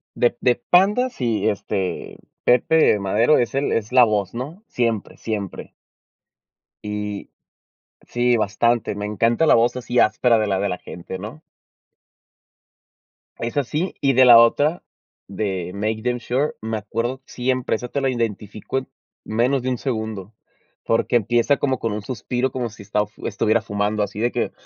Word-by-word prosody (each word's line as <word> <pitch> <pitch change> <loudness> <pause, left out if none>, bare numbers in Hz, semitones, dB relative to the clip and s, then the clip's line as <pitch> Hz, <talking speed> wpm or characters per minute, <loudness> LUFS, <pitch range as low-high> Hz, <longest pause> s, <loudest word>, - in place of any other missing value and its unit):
De 120 0 +2
de 125 -1 +3
Panda, 195 - +3
sí, 115 - -1
este, 95 -3 -3 0.3
Pepe 125 0 +4
Madero 105 +9 +3
es 120 +2 -1
el 140 +1 0
es 110 0 -1
la 130 -1 +8
voz 105 -4 -1
¿no? 145 - -7
Siempre, 115 -4 -2
siempre. 105 -4 -5 1.1
Y 105 -1 -5 0.8
Sí, 120 0 +2
bastante. 115 +1 +1
Me 105 0 -4
encanta 115 +7 +1
la - - +5
voz 120 +2 +3
así 125 -1 -1
áspera 115 +1 +3
de 110 - 0
la 95 -2 0
de 100 +1 0
la 90 - -4
gente 90 +2 -8
¿no? 110 +10 -8 2.0
Es 115 0 -4
así, 150 +6 -1
y 135 -1 +3
de 130 +1 +6
la 120 -2 +9
otra, 145 +8 +3 0.4
de 95 -3 -3
MakeDamnSure, 120 +6 -1
me 110 0 -3
acuerdo 115 +5 -3
siempre 130 0 -1
esa 125 +3 -5
te 140 +3 -3
la 135 - +1
identifico 110 0 -3
en 130 - -11 0.4
menos 125 +5 +1
de 130 - -2
un 125 - -1
segundo, 110 -5 -4 0.5
porque 115 +1 +2
empieza 120 +5 +2
como 135 -2 0
con 115 - -2
un 105 - -4
suspiro, 125 +3 -2
como 125 -2 -3
si 105 - -14
está 105 +1 0
f 105 +1 -15
estuviera 110 +2 +1
fumando, 105 0 -1
así 100 0 -3
de 120 +2 +1
que - - -2
115 Hz, 160 wpm, -22 LUFS, 105-125 Hz, 2.0 s, la